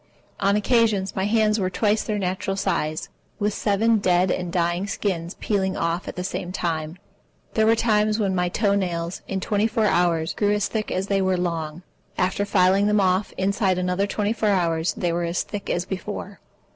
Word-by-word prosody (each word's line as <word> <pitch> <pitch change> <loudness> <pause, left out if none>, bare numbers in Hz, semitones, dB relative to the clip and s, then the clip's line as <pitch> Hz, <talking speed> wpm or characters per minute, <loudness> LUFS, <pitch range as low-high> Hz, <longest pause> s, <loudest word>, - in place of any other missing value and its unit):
On 200 +1 +2
occasion 215 -2 +2
my 190 - -1
hands 215 0 +2
were 185 -2 0
twice 210 +3 +1
their 215 - -2
natural 190 0 -2
size, 165 -5 -1 0.3
with 210 -1 0
seven 220 +2 +2
dead 180 -1 +2
and 180 -1 -2
dying 175 +2 0
skins 185 -4 -2
peeling 190 -3 0
off 170 +2 -1
at - - -5
the 180 - -4
same 180 -1 -4
time. 165 -2 -3 0.6
There 220 0 +3
were 225 - +5
times 215 -2 +2
when 200 -4 0
my 180 -1 +1
toe 200 +2 +1
nails, 175 -3 -2
in 195 - -2
twenty 205 +3 +1
four 220 -1 0
hours, 170 -4 +2
grew 205 -1 +1
as 210 -1 +1
thick 215 -2 -3
as 185 - -1
they 195 -1 +1
were 190 -1 +1
long. 170 -1 -3 0.3
After 190 +2 0
filing 195 +1 +3
them 210 0 +3
off, 190 +1 +1
inside 190 -1 +1
another 180 +2 0
twenty 210 +1 -1
four 220 -2 0
hours 170 -4 +1
they 175 -1 -1
were 175 +1 -1
as 170 +1 -1
thick 205 -1 -6
as 175 +1 0
before. 200 +1 -6
190 Hz, 195 wpm, -23 LUFS, 180-210 Hz, 0.6 s, were